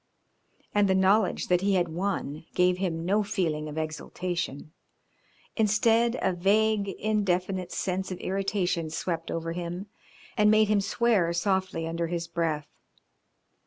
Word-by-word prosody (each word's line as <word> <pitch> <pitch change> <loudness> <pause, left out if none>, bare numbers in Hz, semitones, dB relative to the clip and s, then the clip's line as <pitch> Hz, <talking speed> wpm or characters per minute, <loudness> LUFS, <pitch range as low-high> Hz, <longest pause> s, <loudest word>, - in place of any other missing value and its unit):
And 205 -1 +4
the 190 - +3
knowledge 190 +1 +3
that 180 0 +3
he 195 0 +2
had 175 -1 +2
won 165 -3 -3
gave 180 0 +3
him 165 -3 -2
no 205 +4 +2
feeling 170 -8 -1
of 150 - -8
exultation, 155 -1 -4 0.8
instead 225 +2 +3
a 190 - +2
vague, 205 +3 +2
indefinite 190 -3 -1
sense 190 0 -2
of 185 - -4
irritation 190 -4 -1
swept 165 +1 -3
over 165 0 -3
him 175 +2 -4 0.5
and 210 -2 +4
made 215 0 +4
him 210 -1 +3
swear 200 -5 +2
softly 185 -2 0
under 165 +1 -2
his 170 0 -3
breath. 165 -3 -2
185 Hz, 135 wpm, -27 LUFS, 170-200 Hz, 0.8 s, And